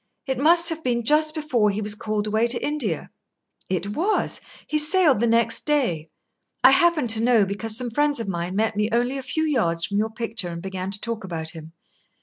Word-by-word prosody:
"It 265 -2 -2
must 335 +4 +5
have 325 -1 -4
been 235 -2 0
just 305 +3 +3
before 255 -9 +1
he 200 +1 -2
was 210 0 -1
called 210 0 -3
away 220 +2 +1
to 240 0 0
India." 245 - -2 0.6
"It 185 +1 -2
was. 360 - -1 0.2
He 305 - +1
sailed 305 - +3
the 235 - +1
next 230 0 +1
day. 235 - 0 0.5
I - - +8
happen 340 -7 +3
to 220 0 +3
know, 230 -3 +4
because 215 +3 -3
some 245 -1 -3
friends 290 +2 +1
of 225 - -4
mine 175 0 -3
met 220 +1 0
me 210 +1 0
only 245 +4 0
a - - -5
few 290 +5 -2
yards 170 - +1
from 200 0 -2
your 220 +1 0
picture 225 -5 -4
and 170 0 -6
began 190 +1 -5
to 200 +1 -2
talk 230 -1 -5
about 165 -3 -3
him. 160 -1 -11
230 Hz, 210 wpm, -23 LUFS, 200-290 Hz, 0.6 s, I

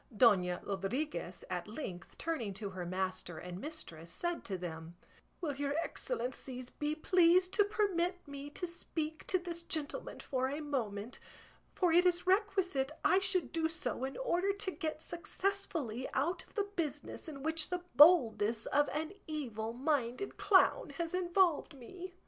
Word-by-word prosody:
Dona 185 -7 +5
Rodriguez, 195 - -3
at 175 0 -3
length, 210 - -7
turning 240 -12 -2
to 200 0 -5
her 180 -2 -5
master 185 -2 -2
and 180 +3 -6
mistress 170 - -7
said 345 -1 -2
to 195 -4 -2
them, 165 -1 -6 0.5
"Will 295 -5 -1
your 285 +1 -1
excellences 255 - -3
be 300 0 -2
pleased 360 +3 +4
to 410 - +5
permit 370 -4 0
me 280 0 -7
to 360 - -4
speak 320 -2 -4
to 370 - +3
this 345 -2 -5
gentleman 320 +7 -3
for 260 -1 -1
a 285 +2 -3
moment, 240 -7 -3 0.6
for 355 -3 +3
it 355 +2 +6
is 355 0 +1
requisite 370 -8 +2
I 375 - +6
should 375 -8 0
do 325 -1 +1
so 260 -6 -3
in 265 +1 -3
order 395 -5 +1
to 400 -1 -2
get 315 -4 -4
successfully 340 - -2
out 315 +7 0
of - - -24
the 410 - +2
business 335 0 -3
in 280 -3 -7
which 320 0 +1
the 360 -1 -2
boldness 235 -8 +6
of 290 0 +3
an 315 +5 -3
evil 235 -8 -3
minded 260 +5 -1
clown 415 +5 +4
has 335 -1 -2
involved 350 -4 +2
me?" 360 +8 -9
305 Hz, 155 wpm, -34 LUFS, 235-355 Hz, 0.6 s, it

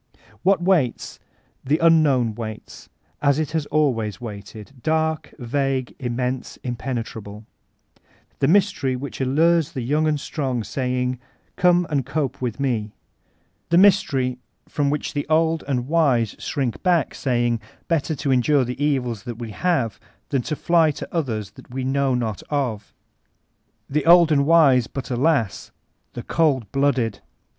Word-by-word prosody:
What 190 -2 +2
waits? 170 -10 0 0.4
The 145 +4 +2
Unknown 150 -9 +3
waits, 110 -1 -8 0.3
as 140 -1 +3
it 155 -1 -2
has 155 -2 -2
always 115 -10 0
waited,— 105 0 -9
dark, 160 0 0
vague, 130 +1 -1
immense, 125 0 -3
impenetrable 115 -4 -5 0.4
— - - -35
the - - +2
Mys 200 +3 +4
tery 130 -2 -2
which 135 +1 -6
allures 160 +4 +2
the 130 - -3
young 150 +5 +1
and 150 -1 +1
strong 130 -6 -3
saying, 125 +3 -2 0.4
''Come 180 -2 +3
and 140 -3 +1
cope 135 0 -2
mth 120 -1 -3
me"; 115 -6 -1 0.8
the 170 - +4
Mystery 135 -10 +3 0.3
from 145 -1 0
which 150 +1 -2
the 145 - -3
old 160 0 +2
and 125 -3 -1
wise 135 -9 +2
shrink 135 -6 -3
back, 175 -5 +2
saying, 120 -3 0 0.3
"Better 160 -1 0
to 140 -1 -2
endure 130 +1 +3
the 125 +4 -4
evils 125 -7 0
that 120 -3 -6
we 115 -2 -6
have 125 - -1 0.3
than 135 -3 +1
fly 160 +4 +2
to 145 - -5
others 110 - -2
that - - -16
we 130 +1 -4
know 135 0 +1
not 110 -5 -2
of"; 125 -9 -2 1.0
the 150 +3 -1
old 170 -1 +7
and 140 -1 +3
wise, 140 -8 +5
but 135 -1 -6
alasl 125 - 0 0.4
the - - -6
cold 135 - +1
blooded! 135 -6 +1
135 Hz, 145 wpm, -22 LUFS, 120-155 Hz, 1.0 s, old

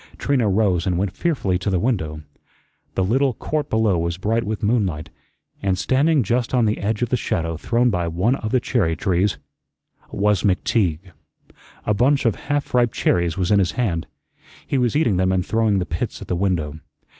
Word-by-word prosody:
Trina 130 -7 +1
rose 95 -4 +1
and 90 -2 +1
went 95 0 -2
fearfully 115 - 0
to 95 - -2
the 95 - +1
window. 80 -9 -2 0.7
The 95 - +1
little 130 +5 +1
court 150 +4 -3
below 110 -5 +2
was 85 +1 -2
bright 110 +4 0
with 110 +1 -4
moonlight, 95 -9 0 0.5
and 95 -2 0
standing 140 - +2
just 120 +2 0
on 120 -2 +3
the 105 0 0
edge 105 +3 -1
of 120 - -1
the - - +2
shadow 85 -8 -2
thrown 120 +8 +1
by 90 -3 -1
one 90 +9 +1
of 110 - -4
the 130 - +3
cherry 100 -10 0
trees 95 +3 0 0.7
was 105 -1 +1
McTeague. 95 - 0 0.7
A 105 - +2
bunch 135 +7 +2
of 115 - +3
half 145 +5 -3
ripe 120 -2 +3
cherries 85 -3 0
was 95 0 0
in 100 - +5
his 90 -3 +1
hand. 90 -10 -1 0.6
He 135 - 0
was 125 0 +1
eating 120 - +2
them 95 0 +2
and 95 -1 0
throwing 110 -1 +1
the 90 - -1
pits 85 - -4
at - - -9
the 90 - -1
window. 85 -5 -1
100 Hz, 190 wpm, -21 LUFS, 90-120 Hz, 0.7 s, in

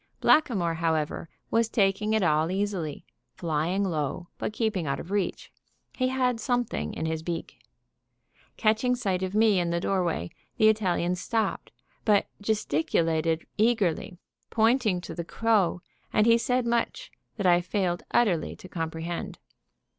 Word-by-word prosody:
Blackamoor, 200 - +3
however, 160 -1 -1 0.2
was 230 0 +2
taking 210 0 +1
it 220 -2 +2
all 155 -1 +2
easily, 185 -6 -2 0.3
flying 170 +4 0
low, 170 -1 -2
but - - -2
keeping 215 -7 -1
out 140 - -1
of 175 - -8
reach. 200 -2 -2 0.4
He 255 - +1
had 255 -2 +1
something 245 - -1
in 160 - -3
his 160 0 -2
beak. 165 0 -5 1.0
Catching 225 +3 +2
sight 195 -7 -1
of 190 +1 -3
me 215 -3 +4
in 175 -1 0
the 170 0 0
doorway, 175 - -1 0.3
the 215 - +6
Italian 185 -5 +1
stopped, 220 +5 -2 0.3
but 205 -2 +4 0.2
gesticulated 165 -5 0
eagerly, 205 -6 +1 0.3
pointing 225 -4 +2
to - - -7
the 170 - -4
crow; 200 -2 +1 0.3
and 215 - +3
he 230 0 +6
said 250 +1 +1
much 235 - -1 0.3
that 200 - -2
I 175 -1 +5
failed 180 -1 -1
utterly 190 -10 +2
to - - -12
comprehend. 165 0 -4
190 Hz, 140 wpm, -27 LUFS, 170-220 Hz, 1.0 s, the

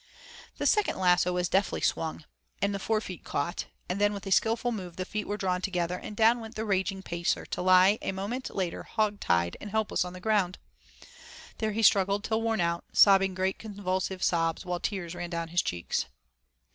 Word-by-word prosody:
The - - -2
second 420 -2 +2
lasso 180 -1 +3
was 180 0 0
deftly 190 +1 +1
swung, 160 -1 -1 0.3
and 200 +1 +1
the 200 - -3
forefeet 215 -4 -2
caught, 170 +6 -3 0.2
and 185 +3 -2
then 205 0 +3
with 200 - -7
a 195 - -5
skilful 230 +5 +2
move 185 -6 -6
the 185 - -4
feet 215 +1 -4
were 205 - -2
drawn 180 -2 -1
together, 180 -2 -1
and 210 - -7
down 230 +2 +5
went 225 0 -9
the 220 - -3
raging 190 -1 -1
Pacer 170 +1 -1
to - - -4
lie 185 +3 +5
a - - -2
moment 205 +7 -4
later 185 -3 -2
'hog 210 -2 -1
tied' 85 0 +1
and 210 - -6
helpless 220 -2 0
on 180 0 -7
the 185 - -8
ground. 195 -3 +1 1.0
There 220 -1 -1
he 225 +2 -1
struggled 200 0 +4
till 220 0 0
worn 225 -3 0
out, 170 0 0
sobbing 195 -2 +5
great 190 +1 -1
convulsive 190 -3 -3
sobs 165 0 +1
while 180 -1 -2
tears 185 -4 -3
ran 175 -1 -5
down 170 -1 -3
his 175 +1 +2
cheeks. 85 -1 -2
190 Hz, 195 wpm, -28 LUFS, 180-210 Hz, 1.0 s, down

